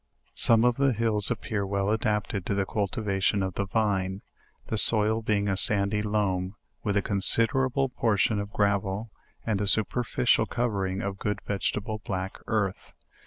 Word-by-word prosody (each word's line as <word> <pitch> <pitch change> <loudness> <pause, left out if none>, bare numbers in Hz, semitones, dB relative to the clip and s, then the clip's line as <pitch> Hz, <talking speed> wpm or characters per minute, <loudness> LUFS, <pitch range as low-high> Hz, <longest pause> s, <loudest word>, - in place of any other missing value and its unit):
Some 115 0 +5
of 125 -1 +2
the 135 -1 +2
hills 110 -2 -1
appear 110 -4 -3
well 100 +1 -2
adapted 105 -3 -2
to 100 - -1
the 100 -1 0
cultivation 100 -1 -1
of 95 -1 -4
the 100 +1 -3
vine; 95 -3 -1 0.4
the 110 - -3
soil 110 +1 +7
being 105 -2 -1
a 95 - 0
san 100 +1 +4
dy 105 0 -1
loam, 100 -3 -2 0.3
with 105 -1 -1
a 100 - 0
considerable 120 +7 0
portion 110 -3 0
of 100 0 -6
.gravel, 100 +1 -1 0.3
and 105 -3 -1
a 100 - -2
super 110 +4 +1
ficial 120 +1 +1
covering 100 -6 -2
of 100 -1 -5
good 105 -2 -3
vegetable 105 +1 -3
black 95 0 -5
earth. 100 -3 -3
105 Hz, 165 wpm, -26 LUFS, 100-110 Hz, 0.4 s, soil